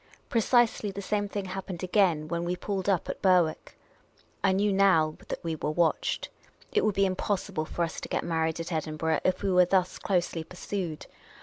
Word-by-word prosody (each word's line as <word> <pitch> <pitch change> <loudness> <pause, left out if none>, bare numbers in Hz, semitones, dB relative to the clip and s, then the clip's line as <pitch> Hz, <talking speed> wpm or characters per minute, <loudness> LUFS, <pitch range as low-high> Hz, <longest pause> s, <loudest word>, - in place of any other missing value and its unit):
Precisely 230 -2 +3
the 195 0 -6
same 205 +1 -1
thing 200 -1 -3
happened 185 -1 -6
again 180 -5 +2
when 170 +2 -2
we 175 +1 -1
pulled 195 +1 -3
up 185 -4 +1
at - - -5
Berwick, 180 -4 +2 0.7
I 195 - +4
knew 200 +1 +2
now 165 -6 +4
that - - -5
we 165 -1 -2
were 150 - -3
watched. 165 +1 0 0.4
It - - +2
would 215 -2 +1
be 195 - +3
impossible 190 -2 -1
for 170 - -2
us 165 - -4
to - - -7
get - - -1
married 160 -1 -1
at 165 +2 -5
Edinburgh 160 0 -1
if 185 +1 0
we 195 - +1
were 180 0 +6
thus 185 0 +1
closely 175 -3 0
pursued. 175 -1 -5
180 Hz, 190 wpm, -28 LUFS, 165-195 Hz, 0.7 s, were